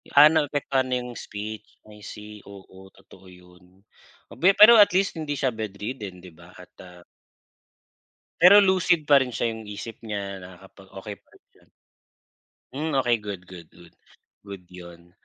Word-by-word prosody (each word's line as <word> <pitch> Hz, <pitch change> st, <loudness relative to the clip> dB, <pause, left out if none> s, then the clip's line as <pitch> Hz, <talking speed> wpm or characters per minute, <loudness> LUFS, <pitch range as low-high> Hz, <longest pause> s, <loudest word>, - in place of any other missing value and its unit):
ah, 150 Hz, +2 st, +8 dB
naapektuhan 145 Hz, -4 st, -1 dB
na 125 Hz, -, 0 dB
'yung 125 Hz, 0 st, -7 dB
speech, 105 Hz, +1 st, -8 dB, 0.2 s
I 105 Hz, 0 st, -15 dB
see, 105 Hz, 0 st, -11 dB
oo 95 Hz, -1 st, -15 dB, 0.2 s
totoo 95 Hz, -, -19 dB
yun, 90 Hz, 0 st, -19 dB, 0.7 s
o -, -, -13 dB
be 190 Hz, +3 st, +4 dB
pero 215 Hz, +3 st, +9 dB
at 205 Hz, -3 st, +5 dB
least 195 Hz, -3 st, 0 dB
hindi 150 Hz, -2 st, -4 dB
siya 130 Hz, -3 st, -1 dB
bedridden 105 Hz, -2 st, -7 dB
'di 90 Hz, -1 st, -14 dB
ba -, -, -16 dB
at, -, -, -16 dB
ah 90 Hz, -1 st, -16 dB, 1.4 s
Pero 190 Hz, +4 st, +8 dB
lucid 180 Hz, -3 st, +2 dB
pa 140 Hz, -, +7 dB
rin 130 Hz, -, -3 dB
siya 115 Hz, -, -1 dB
'yung 110 Hz, 0 st, -10 dB
isip 105 Hz, +2 st, -8 dB
niya, 100 Hz, -3 st, -6 dB
nakakapag 95 Hz, +1 st, -16 dB
okey 105 Hz, +1 st, -8 dB
pa -, -, -49 dB
rin -, -, -24 dB
siya? -, -, -27 dB, 1.1 s
Hmm, 150 Hz, +2 st, -4 dB
okey 120 Hz, -1 st, +1 dB
good, 100 Hz, -3 st, -7 dB
good, 85 Hz, -3 st, -12 dB
good, 85 Hz, -1 st, -18 dB, 0.5 s
good 100 Hz, -2 st, -10 dB
iyun. 85 Hz, -1 st, -14 dB
105 Hz, 165 wpm, -24 LUFS, 95-140 Hz, 1.4 s, pero